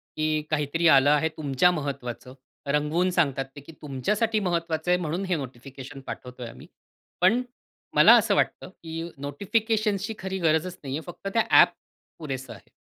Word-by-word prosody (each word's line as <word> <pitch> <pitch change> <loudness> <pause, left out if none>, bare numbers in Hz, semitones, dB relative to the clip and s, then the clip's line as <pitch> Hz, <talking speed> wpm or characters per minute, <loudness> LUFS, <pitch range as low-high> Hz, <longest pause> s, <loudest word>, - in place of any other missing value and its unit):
की 155 0 0
काहीतरी 155 +2 +1
आलं 140 -2 +6
आहे 150 +2 +2
तुमच्या 150 +3 +3
महत्त्वाचं. 135 -5 -5 0.3
रंगवून 150 +5 +1
सांगतात 140 -5 -1
की - - -11
तुमच्यासाठी 210 - 0
महत्वाचं 170 -3 -1
आहे 180 - +4
म्हणून 170 +3 -2
हे 185 -1 0
नोटिफिकेशन 135 0 -8
पाठवतो 125 0 -8
आहे 115 - -7
आम्ही. - - -14 0.5
पण 195 +7 +4 0.5
मला - - +8
असं - - +3
वाटतं - - 0
की 165 -3 -8 0.2
नोटिफिकेशन्सची 210 - -1
खरी 190 0 -4
गरजच 165 +1 +1
नाही 135 -1 -4
आहे. - - -5
फक्त 195 - -10
त्या 230 - +3 0.2
ॲप - - +4 0.5
पुरेसं 135 -4 -6
आहे. - - -17
155 Hz, 155 wpm, -26 LUFS, 140-180 Hz, 0.5 s, मला